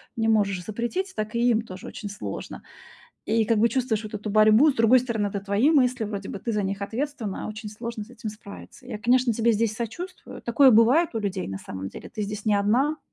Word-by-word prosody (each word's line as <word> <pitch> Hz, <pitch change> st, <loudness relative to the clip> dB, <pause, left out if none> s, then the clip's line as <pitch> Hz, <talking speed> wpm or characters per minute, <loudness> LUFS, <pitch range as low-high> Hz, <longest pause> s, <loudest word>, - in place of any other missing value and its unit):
не 225 Hz, -1 st, +1 dB
можешь 200 Hz, -4 st, +1 dB
запретить, 240 Hz, -, -3 dB
так 215 Hz, +1 st, -4 dB
и 240 Hz, +1 st, +3 dB
им 225 Hz, -2 st, +3 dB
тоже 185 Hz, -4 st, -10 dB
очень 205 Hz, -, -7 dB
сложно. 205 Hz, -, -7 dB, 0.6 s
И 225 Hz, 0 st, +2 dB
как 230 Hz, -, +2 dB
бы 230 Hz, +2 st, +4 dB
чувствуешь 235 Hz, -3 st, -1 dB
вот 215 Hz, -, -8 dB
эту 210 Hz, +1 st, -4 dB
борьбу. 215 Hz, +7 st, +6 dB
И -, -, +4 dB
с -, -, -18 dB
другой 230 Hz, +3 st, +5 dB
стороны, 225 Hz, -4 st, -1 dB
это 200 Hz, 0 st, -4 dB
твои 200 Hz, +8 st, +2 dB
мысли, 255 Hz, -6 st, +2 dB
вроде 205 Hz, -2 st, -5 dB
бы -, -, -5 dB
ты 230 Hz, +3 st, -3 dB
за 210 Hz, -, 0 dB
них 195 Hz, +1 st, -3 dB
ответственна, 230 Hz, -1 st, -4 dB
а -, -, -4 dB
очень 215 Hz, 0 st, -7 dB
сложно 225 Hz, 0 st, -6 dB
с 225 Hz, -, -19 dB
этим 235 Hz, -2 st, -7 dB
справиться. 210 Hz, +4 st, -11 dB
Я, 230 Hz, -4 st, -5 dB
конечно, 245 Hz, +2 st, +3 dB
тебе 230 Hz, +1 st, +2 dB
здесь 215 Hz, 0 st, 0 dB
сочувствую. 345 Hz, -, -7 dB
Такое 260 Hz, +3 st, +5 dB
бывает 250 Hz, +9 st, +5 dB
у -, -, 0 dB
людей 195 Hz, -3 st, -3 dB
на 95 Hz, 0 st, -5 dB
самом 95 Hz, 0 st, -7 dB
деле. -, -, -10 dB
Ты 225 Hz, -, -7 dB
здесь 205 Hz, +1 st, -5 dB
не 215 Hz, -, +3 dB
1. 245 Hz, +10 st, +2 dB
220 Hz, 235 wpm, -25 LUFS, 205-245 Hz, 0.6 s, борьбу